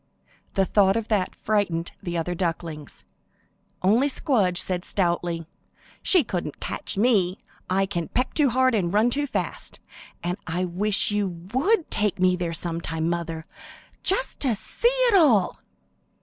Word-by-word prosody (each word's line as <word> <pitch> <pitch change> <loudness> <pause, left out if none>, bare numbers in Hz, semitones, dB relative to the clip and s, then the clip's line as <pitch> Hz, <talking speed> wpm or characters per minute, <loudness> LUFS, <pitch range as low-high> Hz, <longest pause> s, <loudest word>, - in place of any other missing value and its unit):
The 195 - +3
thought 195 +1 +3
of 225 -1 -4
that 200 -4 0
frightened 190 -6 -1
the 175 -3 -3
other 170 +2 -2
ducklings—only 175 - -3
Squdge 220 - +1
said 180 0 +1
stoutly, 170 -3 -1 0.6
"She 360 -5 +5
couldn't 175 - -4
catch - - -3
me! 200 -5 +2 0.3
I 195 +1 +2
can 175 -4 -3
peck 250 +1 -1
too 295 -3 +3
hard 260 +1 +3
and 185 -6 +1
run 215 +5 +3
too 290 +3 +1
fast, - - -4 0.4
and 175 +2 -2
I 180 +2 -1
wish 200 +4 +2
you 205 -1 +1 0.3
would 345 - +2
take 210 -3 0
me 185 0 +3
there 175 -2 -3
some 165 0 -3
time, 165 0 -2
mother, 165 -2 -4 0.6
just 445 +7 -1
to 255 -6 +1
see 465 - -1
it - - +3
all." 270 - +4
195 Hz, 150 wpm, -24 LUFS, 175-240 Hz, 0.6 s, She